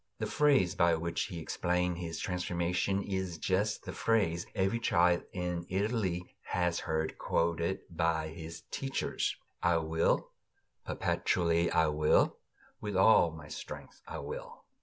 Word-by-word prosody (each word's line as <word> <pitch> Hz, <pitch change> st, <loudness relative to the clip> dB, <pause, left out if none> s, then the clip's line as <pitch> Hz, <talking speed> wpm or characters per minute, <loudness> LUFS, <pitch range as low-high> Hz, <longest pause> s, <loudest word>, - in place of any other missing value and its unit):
The -, -, -2 dB
phrase 135 Hz, -12 st, +3 dB
by 85 Hz, -3 st, +4 dB
which 85 Hz, +1 st, -1 dB
he 90 Hz, -3 st, -6 dB
explained 90 Hz, +2 st, 0 dB
his 85 Hz, -2 st, -4 dB
transformation 90 Hz, +2 st, -1 dB
is 95 Hz, -3 st, -3 dB
just 100 Hz, +5 st, 0 dB
the -, -, -6 dB
phrase 95 Hz, -7 st, +1 dB
every 95 Hz, +5 st, +1 dB
child 85 Hz, -4 st, +3 dB
in 90 Hz, -2 st, -3 dB
Italy 95 Hz, -3 st, -1 dB
has 90 Hz, -1 st, 0 dB
heard 80 Hz, -1 st, -2 dB
quoted 85 Hz, +2 st, 0 dB
by 80 Hz, -2 st, 0 dB
his 80 Hz, 0 st, -8 dB
teachers: 135 Hz, 0 st, -1 dB, 0.3 s
"I 85 Hz, 0 st, +3 dB
willed, 80 Hz, 0 st, +2 dB, 0.6 s
perpetually 85 Hz, -1 st, +1 dB
I 80 Hz, -1 st, +3 dB
willed, 75 Hz, 0 st, +4 dB, 0.5 s
with 105 Hz, -2 st, -3 dB
all 95 Hz, -3 st, +6 dB
my 80 Hz, -2 st, -10 dB
strength 75 Hz, -, -8 dB
I -, -, -5 dB
willed." -, -, -7 dB
85 Hz, 135 wpm, -32 LUFS, 85-95 Hz, 0.6 s, all